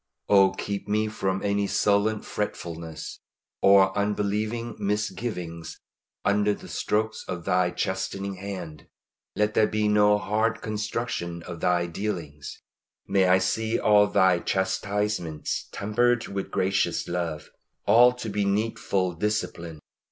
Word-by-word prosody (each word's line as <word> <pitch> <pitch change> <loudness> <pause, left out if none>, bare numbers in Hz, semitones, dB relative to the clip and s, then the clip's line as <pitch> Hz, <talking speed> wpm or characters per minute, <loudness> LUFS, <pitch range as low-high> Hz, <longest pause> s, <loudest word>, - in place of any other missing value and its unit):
Oh 95 -1 +6
keep 100 +1 -4
me 105 +1 +1
from 95 -2 -2
any 100 0 +1
sullen 105 +2 +2
fretfulness, 85 -6 -5 0.4
or 95 -1 +6
unbelieving 105 +3 -1
misgivings, 100 -5 -3 0.5
under 105 0 +2
the - - -12
strokes 110 +1 -1
of 85 -2 -5
Thy 90 -1 +2
chastening 95 +2 -3
hand. 90 -6 -7 0.5
Let 105 0 +1
there 110 - +4
be 110 0 0
no 105 0 +4
hard 110 +2 0
construction 105 -5 -3
of 85 -2 -8
Thy 90 0 +2
dealings. 85 -6 -5 0.4
May 95 -1 +3
I 90 +1 +6
see 110 +5 0
all 105 -1 +5
Thy 95 -3 +3
chastisements 95 -3 -2
tempered 115 +3 +1
with 100 -1 -4
gracious 95 +1 0
love 85 -3 -3 0.3
all 120 +2 +7
to 125 -2 -7
be 105 0 0
needful 100 -2 0
discipline. 85 -4 -3
100 Hz, 120 wpm, -26 LUFS, 90-105 Hz, 0.5 s, all